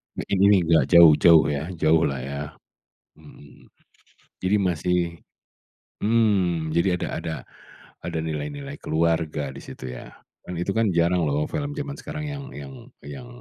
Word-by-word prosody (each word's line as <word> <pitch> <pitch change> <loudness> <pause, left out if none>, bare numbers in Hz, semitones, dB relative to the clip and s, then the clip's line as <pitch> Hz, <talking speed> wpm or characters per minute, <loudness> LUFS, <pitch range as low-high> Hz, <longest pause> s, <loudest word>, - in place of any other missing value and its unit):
Mungkin 100 - -2
ini, 100 0 +6
nggak 80 -1 +3
jauh-jauh 80 -1 +7
ya, 75 +2 -2
jauh 80 0 +3
lah, 65 -2 -3
ya, 70 +1 -5 0.8
mhm. 75 -1 -17 0.7
Jadi 95 +3 +2
masih 90 -1 0 1.0
mhm, 95 -8 +1
jadi 90 +2 +2
ada - - -3
ada 80 -1 -4 0.7
ada 80 - -3
nilai-nilai 140 - -5
keluarga 80 -4 -1
di - - -10
situ - - -10
ya, 60 - -10 0.3
kan 90 - -8
itu 90 +3 -2
kan, 115 -2 +2
jarang 85 0 +2
loh 75 +2 0
film 145 -1 -4
zaman 145 -1 -4
sekarang 150 0 -6
yang 140 -1 -7
yang 70 -2 -8 0.3
yang 75 - -9
85 Hz, 145 wpm, -24 LUFS, 75-100 Hz, 1.0 s, jauh-jauh